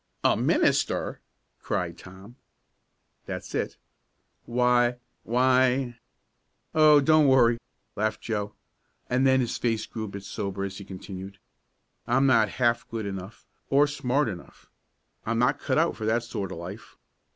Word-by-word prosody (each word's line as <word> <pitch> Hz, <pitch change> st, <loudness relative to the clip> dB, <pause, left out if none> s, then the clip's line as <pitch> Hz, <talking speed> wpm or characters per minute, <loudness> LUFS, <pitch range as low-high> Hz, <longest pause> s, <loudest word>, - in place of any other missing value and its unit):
"A -, -, +4 dB
minister!" -, -, +1 dB, 0.4 s
cried -, -, -2 dB
Tom. 95 Hz, +5 st, -13 dB, 0.9 s
"That's -, -, -6 dB
it." -, -, -2 dB, 0.7 s
"Why 120 Hz, 0 st, +2 dB, 0.2 s
why 125 Hz, 0 st, +2 dB, 0.4 s
" -, -, -48 dB
"Oh, 155 Hz, -2 st, +6 dB
don't 155 Hz, +1 st, +5 dB
worry!" 120 Hz, -3 st, +4 dB, 0.4 s
laughed 110 Hz, +1 st, -1 dB
Joe, 105 Hz, -2 st, -3 dB, 0.6 s
and 130 Hz, +2 st, +3 dB
then 130 Hz, 0 st, +4 dB
his 120 Hz, -1 st, -2 dB
face 115 Hz, -2 st, 0 dB
grew 110 Hz, -2 st, -6 dB
a -, -, -6 dB
bit 100 Hz, 0 st, -8 dB
sober 100 Hz, 0 st, -4 dB
as 95 Hz, 0 st, -5 dB
he 100 Hz, -, -9 dB
continued: 95 Hz, +1 st, -8 dB, 0.7 s
"I'm 130 Hz, +3 st, +3 dB
not 115 Hz, -5 st, +4 dB
half 120 Hz, -1 st, +1 dB
good 115 Hz, -2 st, -4 dB
enough 95 Hz, +1 st, -7 dB, 0.2 s
or 140 Hz, +2 st, +5 dB
smart 140 Hz, -1 st, 0 dB
enough. 90 Hz, -5 st, -9 dB, 0.5 s
I'm 115 Hz, +1 st, -1 dB
not 125 Hz, +4 st, +2 dB
cut -, -, -1 dB
out 165 Hz, +2 st, +2 dB
for 110 Hz, -, -4 dB
that 115 Hz, +1 st, +1 dB
sort 105 Hz, -5 st, -5 dB
of -, -, -6 dB
life. 90 Hz, +5 st, -9 dB
120 Hz, 145 wpm, -26 LUFS, 100-130 Hz, 0.9 s, Oh